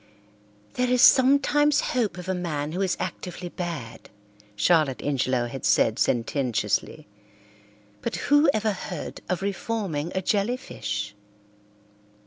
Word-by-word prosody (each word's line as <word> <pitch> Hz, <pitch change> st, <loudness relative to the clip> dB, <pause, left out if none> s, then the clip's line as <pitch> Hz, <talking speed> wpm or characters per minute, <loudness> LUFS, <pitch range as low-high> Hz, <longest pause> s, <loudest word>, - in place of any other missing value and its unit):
"There 250 Hz, 0 st, 0 dB
is 250 Hz, +1 st, +3 dB
sometimes 285 Hz, +2 st, +5 dB
hope 235 Hz, -6 st, 0 dB
of 180 Hz, 0 st, -8 dB
a 190 Hz, -, 0 dB
man 155 Hz, -5 st, -3 dB
who 180 Hz, +4 st, -3 dB
is 190 Hz, -2 st, 0 dB
actively 180 Hz, 0 st, -5 dB
bad," 165 Hz, -11 st, -6 dB, 0.5 s
Charlotte 150 Hz, +3 st, +3 dB
Ingelow 130 Hz, -3 st, 0 dB
had 130 Hz, +2 st, -7 dB
said 100 Hz, +2 st, +3 dB
sententiously, 120 Hz, -2 st, -1 dB, 0.9 s
"but -, -, -3 dB
who 290 Hz, -, +3 dB
ever 215 Hz, -3 st, 0 dB
heard 190 Hz, -, -6 dB
of 185 Hz, +1 st, -1 dB
reforming 195 Hz, -6 st, -2 dB
a 190 Hz, -, -1 dB
jellyfish?" 200 Hz, -, -2 dB
180 Hz, 115 wpm, -25 LUFS, 140-230 Hz, 0.9 s, sometimes